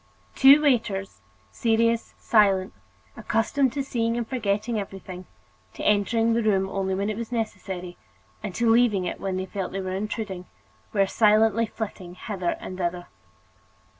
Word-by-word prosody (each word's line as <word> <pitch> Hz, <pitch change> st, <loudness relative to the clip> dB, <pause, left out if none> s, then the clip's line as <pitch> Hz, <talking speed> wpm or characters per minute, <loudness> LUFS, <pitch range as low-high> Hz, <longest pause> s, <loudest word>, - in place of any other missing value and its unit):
Two 280 Hz, +3 st, +7 dB
waiters, 205 Hz, -, 0 dB, 0.3 s
serious, 230 Hz, -, +1 dB
silent, 195 Hz, -4 st, +3 dB, 0.4 s
accustomed 225 Hz, +5 st, +1 dB
to 280 Hz, -1 st, -2 dB
seeing 230 Hz, -3 st, -1 dB
and 235 Hz, -2 st, -2 dB
forgetting 215 Hz, -2 st, -1 dB
everything, 190 Hz, -2 st, -8 dB, 0.5 s
to -, -, -7 dB
entering 225 Hz, +3 st, +2 dB
the 235 Hz, -, +1 dB
room 195 Hz, -3 st, +2 dB
only 190 Hz, -1 st, -2 dB
when 200 Hz, +1 st, -1 dB
it 210 Hz, -, -5 dB
was 235 Hz, 0 st, -5 dB
necessary 190 Hz, -6 st, -4 dB, 0.4 s
and 180 Hz, -, -6 dB
to 235 Hz, -, +1 dB
leaving 225 Hz, -5 st, +4 dB
it -, -, -4 dB
when 190 Hz, -1 st, -2 dB
they 185 Hz, -, -2 dB
felt 190 Hz, -1 st, -5 dB
they 195 Hz, -, -2 dB
were 185 Hz, -1 st, -4 dB
intruding, 195 Hz, -2 st, -4 dB, 0.4 s
were 195 Hz, -, +3 dB
silently 220 Hz, +2 st, +3 dB
flitting 190 Hz, -5 st, -7 dB
hither 185 Hz, -2 st, -3 dB
and 185 Hz, 0 st, -8 dB
thither. 175 Hz, 0 st, -3 dB
210 Hz, 150 wpm, -25 LUFS, 190-230 Hz, 0.5 s, Two